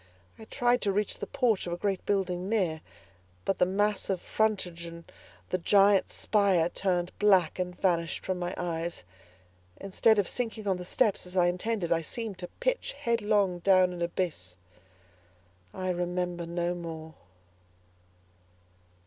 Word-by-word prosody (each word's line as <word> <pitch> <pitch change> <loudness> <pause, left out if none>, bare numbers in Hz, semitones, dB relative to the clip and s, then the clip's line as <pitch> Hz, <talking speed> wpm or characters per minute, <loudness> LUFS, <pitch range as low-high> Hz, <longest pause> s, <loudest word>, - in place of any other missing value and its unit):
I 220 - -10
tried 245 +2 +1
to 200 - +1
reach 205 +1 -1
the - - -4
porch 245 -9 +1
of 170 - -2
a - - -3
great 195 0 -1
building 190 -2 0
near, 180 -8 0 0.6
but 195 - 0
the 180 - +4
mass 205 +2 0
of 190 -2 0
frontage 190 -6 -1
and 170 0 -9 0.5
the 185 - +1
giant 200 +2 +4
spire 195 -6 +2
turned 180 -1 -1
black 190 -5 +4
and 180 -1 -3
vanished 170 -3 0
from 185 -1 -2
my 175 +1 -3
eyes. 170 - -3 0.7
Instead 205 +3 +2
of 205 - +2
sinking 225 -3 -3
on 190 -2 +1
the 180 - -7
steps 210 -2 +1
as 180 +1 -6
I 180 - +5
intended, 180 +1 -1
I 165 -1 +3
seemed 215 +3 -5
to 180 - -5
pitch - - -1
headlong 210 - +1
down 185 0 +4
an 175 - -7
abyss. 170 - -2 1.1
I 185 - -2
remember 175 -1 -2
no 175 +1 -1
more. 160 -2 -7
185 Hz, 150 wpm, -29 LUFS, 175-205 Hz, 1.1 s, I